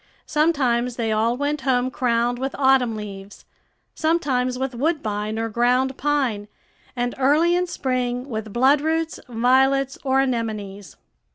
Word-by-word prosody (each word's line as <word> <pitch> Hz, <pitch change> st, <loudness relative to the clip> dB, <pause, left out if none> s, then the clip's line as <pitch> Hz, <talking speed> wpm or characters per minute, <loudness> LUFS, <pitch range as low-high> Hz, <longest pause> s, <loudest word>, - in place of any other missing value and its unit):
Sometimes 255 Hz, -6 st, +1 dB
they 225 Hz, -2 st, -1 dB
all 225 Hz, +3 st, +1 dB
went 290 Hz, +1 st, -2 dB
home 255 Hz, -1 st, +1 dB
crowned 240 Hz, -1 st, 0 dB
with 270 Hz, +1 st, -3 dB
autumn 265 Hz, -4 st, +3 dB
leaves, 200 Hz, -2 st, -9 dB, 0.5 s
sometimes 265 Hz, -6 st, 0 dB
with 265 Hz, 0 st, -3 dB
woodbine 220 Hz, -7 st, -2 dB
or 225 Hz, 0 st, -1 dB
ground 250 Hz, +4 st, +1 dB
pine, 265 Hz, -9 st, -1 dB, 0.5 s
and 245 Hz, 0 st, -1 dB
early 305 Hz, +6 st, +3 dB
in 360 Hz, 0 st, 0 dB
spring 255 Hz, -4 st, -2 dB
with 220 Hz, -4 st, -5 dB
bloodroots, 300 Hz, +7 st, +1 dB
violets, 265 Hz, +3 st, +2 dB
or 265 Hz, -1 st, +2 dB
anemones. 215 Hz, -6 st, -3 dB
250 Hz, 125 wpm, -22 LUFS, 230-275 Hz, 0.5 s, autumn